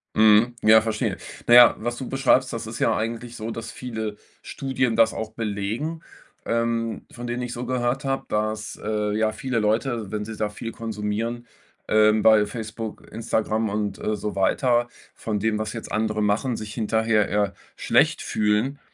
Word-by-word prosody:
Mhm. 110 +2 +5
Ja, 110 +1 +7
verstehe. 110 -1 -2 0.3
Na 120 - +4
ja, 120 0 +9
was 120 +2 -3
du 130 - -5
beschreibst, 135 -1 +2
das 115 -1 -4
ist 115 - -6
ja 115 - +2
eigentlich 115 +2 -4
so, 110 +1 -5
dass 115 0 -6
viele 110 -3 -5 0.3
Studien 130 -3 -1
das 110 0 +4
auch 110 0 -5
belegen, 115 +10 -3 0.4
ähm, 115 -1 -1
von 120 0 -7
denen 120 +1 -3
ich 120 - -4
so 125 +1 -5
gehört 130 +2 -1
habe, 135 0 -1
dass, 110 0 -2
äh, 105 -1 -1
ja, 110 -1 +1
viele 130 -5 -2
Leute, 110 0 -1
wenn 105 0 -2
sie 110 0 -7
da 105 - 0
viel 115 +2 -6
konsumieren, 115 +1 -3 0.4
ähm, 110 0 +4
bei 110 -1 +6
Facebook, 110 0 -7
Instagram 110 -1 -1
und, 105 -1 -2
äh, 105 - -1
so 105 0 -4
weiter, 120 +5 +2 0.3
von 105 -2 -3
dem, 110 0 0
was 110 +1 -3
jetzt 115 - -7
andere 110 0 0
machen, 115 +4 +1
sich 105 0 -6
hinterher 110 -1 +1
eher 105 -1 0 0.2
schlecht - - +2
fühlen. 110 +7 0
110 Hz, 175 wpm, -24 LUFS, 105-120 Hz, 0.4 s, ja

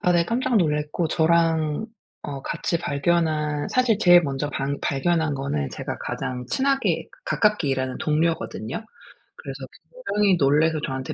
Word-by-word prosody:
아 180 - +2
네. 170 -1 +3
깜짝 245 +4 0
놀랐고 150 -1 0
저랑 165 +1 +2 0.4
어 140 -1 -6
같이 170 - -2
발견한 150 -1 0
사실 245 -5 +2
제일 175 -2 +7
먼저 140 -1 -2
방 140 0 -2
발견한 155 +2 0
거는 75 - -2
제가 - - -5
가장 125 -1 -4
친하게 270 0 0 0.2
가깝게 210 -9 +1
일하는 130 -1 -1
동료거든요. 155 - -1 0.5
그래서 - - -7 0.4
굉장히 210 - +1
놀라서 155 +3 +3
저한테 130 +2 -4
160 Hz, 305 characters per minute, -24 LUFS, 140-175 Hz, 0.5 s, 제일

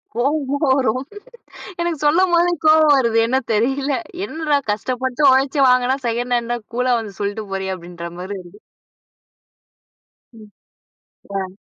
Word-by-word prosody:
கோவமா 280 +2 0 0.2
வரும். 255 0 0 0.8
எனக்கு 340 -2 -1
சொல்லம்போது 345 +2 +3
கோவம் 310 -1 +6
வருது. 235 -3 +1
என்ன 260 +2 +1 0.2
தெரியல. 270 +6 0 0.3
"என்னடா! 310 -5 0
கஷ்டப்பட்டு 255 +5 -3
உழைச்சி 270 +2 +2
வாங்குனா, 250 +1 +3
செகண்ட் 245 +1 -1
ஹேண்டா? 240 0 -2 0.2
கூலா 250 0 +1
வந்து 215 -3 -7
சொல்லிட்டு 205 +1 -3
போறியா?" 190 0 -2
அப்படின்ற 170 0 -9
மாரி 190 +3 -6
வருது. 180 +3 -16 1.7
ம். 215 -2 -15 0.9
ஆ. 190 0 -7
250 Hz, 120 wpm, -20 LUFS, 215-285 Hz, 1.7 s, கோவம்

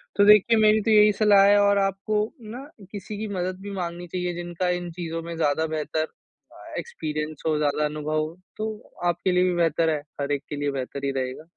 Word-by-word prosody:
तो 200 - +5
देखिए 210 +2 +6
मेरी 215 0 +5
तो 225 - +1
यही 210 0 +7
सलाह 200 -1 +5
है 205 - +6
और 200 0 +4
आपको 195 +2 0 0.3
ना 255 +4 -7 0.3
किसी 205 0 -7
की 215 +1 -4
मदद 185 0 -3
भी 200 0 -7
माँगनी 175 -2 -5
चाहिए, 180 0 -3
जिनका 175 +1 -3
इन 175 -1 -2
चीज़ों 165 -1 -5
में 170 0 -6
ज़्यादा 160 0 +1
बेहतर 155 0 -2 0.5
अ, - - -13
एक्सपीरियंस 155 - -5
हो, 155 - +2
ज़्यादा 150 0 +1
अनुभव 150 +1 -2
हो, 155 +3 -4 0.2
तो 215 0 -5 0.2
आपके 175 +2 0
लिए 180 0 +3
भी 185 -1 +2
बेहतर 165 -1 +2
है, 155 -2 0 0.2
हर 140 - -2
एक 145 -1 -1
के 150 - -4
लिए 145 0 -1
बेहतर 135 +1 -4
ही 140 - 0
रहेगा। 130 +2 -4
175 Hz, 215 wpm, -25 LUFS, 155-200 Hz, 0.5 s, यही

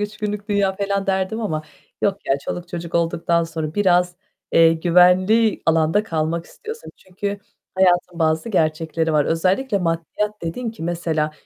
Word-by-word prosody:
3 210 +1 -4
günlük 210 0 -4
dünya." 200 -2 +1
falan 200 0 -1
derdim 190 +3 -1
ama 155 -8 -2 0.4
yok 200 -1 +1
ya, 135 - +3
çoluk 175 0 -5
çocuk 170 -1 -6
olduktan 170 0 +1
sonra 160 -1 -5
biraz, 180 -3 +2 0.4
eee, 165 0 +6
güvenli 180 +6 +4
alanda 165 +4 +3
kalmak 165 -3 -2
istiyorsun. 450 - -9
Çünkü 200 +2 -5 0.4
hayatın 180 -2 +2
bazı 160 +4 +1
gerçekleri 160 -3 0
var. 150 -1 +3
Özellikle 190 +8 +1
maddiyat 180 +5 -2
dedin 220 +9 -3
ki 220 -6 -11
mesela 165 -2 -1
180 Hz, 145 wpm, -21 LUFS, 165-200 Hz, 0.4 s, eee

